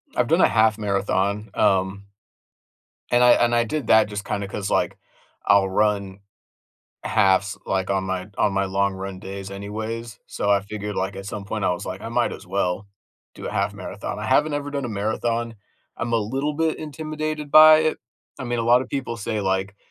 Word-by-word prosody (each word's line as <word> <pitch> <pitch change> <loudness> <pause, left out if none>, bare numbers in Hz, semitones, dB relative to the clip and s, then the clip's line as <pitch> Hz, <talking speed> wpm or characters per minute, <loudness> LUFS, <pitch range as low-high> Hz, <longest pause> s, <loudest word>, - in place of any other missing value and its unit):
I've - - +2
done - - +3
a - - +7
half 110 0 +3
marathon, 100 0 -1
um, 95 +1 +1 1.1
and 120 0 +4
I 125 - +7
and 120 0 +2
I 120 - +3
did 135 +1 -3
that 110 0 +5
just 105 -1 -5
kinda 100 -1 -3
'cause, 100 0 -4
like, - - +1 0.5
I'll 100 -1 +4
run 100 -1 0 0.9
halves, 100 -1 +2
like, 95 0 -1
on 95 -1 0
my 95 0 -3
on 100 - +2
my 100 0 +1
long 100 +1 0
run 95 0 -6
days 95 0 -7
anyways, 110 +3 -6
so 100 - -2
I 100 -1 +4
figured, 105 +1 -6
like, 95 +1 -2
at 95 0 -7
some 100 0 -5
point 100 0 -3
I - - +3
was 90 +3 -3
like, 95 +1 -5
"I 115 - -6
might 120 +1 0
as - - -10
well 95 +1 -1 0.5
do - - -8
a - - -4
half - - 0
marathon," - - -6
I - - -4
haven't 150 0 +3
ever 145 0 -3
done 140 -1 -3
a - - -3
marathon, 115 +2 -2 0.4
I'm 115 0 -3
a - - +4
little 135 +7 -1
bit 160 0 0
intimidated 155 0 -5
by 155 0 +9
it, 155 0 0 0.4
I - - -4
mean, 120 -1 -2
a - - 0
lot 120 +2 +4
of 125 - -10
people 130 -4 -3
say, 110 0 -3
like, 95 +1 -1
105 Hz, 200 wpm, -23 LUFS, 100-120 Hz, 1.1 s, by